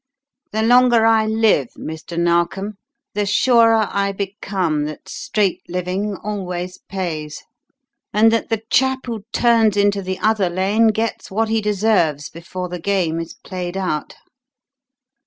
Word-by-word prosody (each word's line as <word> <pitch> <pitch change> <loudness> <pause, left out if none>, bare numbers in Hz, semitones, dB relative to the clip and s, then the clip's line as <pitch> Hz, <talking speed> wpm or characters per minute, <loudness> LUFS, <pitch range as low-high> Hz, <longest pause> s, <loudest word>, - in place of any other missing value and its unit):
The 220 +1 0
longer 240 -1 +5
I 220 -1 +4
live, 220 - +2
Mr. 160 +2 -7
Narkom, 175 +4 0 0.3
the 205 0 -1
surer 225 0 +4
I 200 0 0
become 195 -6 -2
that 155 0 -8
straight 205 -4 -1
living 180 +3 -2
always 180 -3 -4
pays; 160 -6 -4 0.7
and 220 +2 +4
that 230 - 0
the 225 -1 -1
chap 265 0 +2
who 230 -4 -5
turns 225 -4 +3
into 200 0 +2
the 185 0 -4
other 215 -4 +1
lane 195 +6 +2
gets 220 +1 -1
what 220 +3 0
he 225 0 +1
deserves 200 -8 +1
before 180 +2 -6
the 180 0 -6
game 180 -5 0
is 165 0 -6
played 180 -1 -5
out." 180 -6 -3
200 Hz, 140 wpm, -20 LUFS, 180-220 Hz, 0.7 s, longer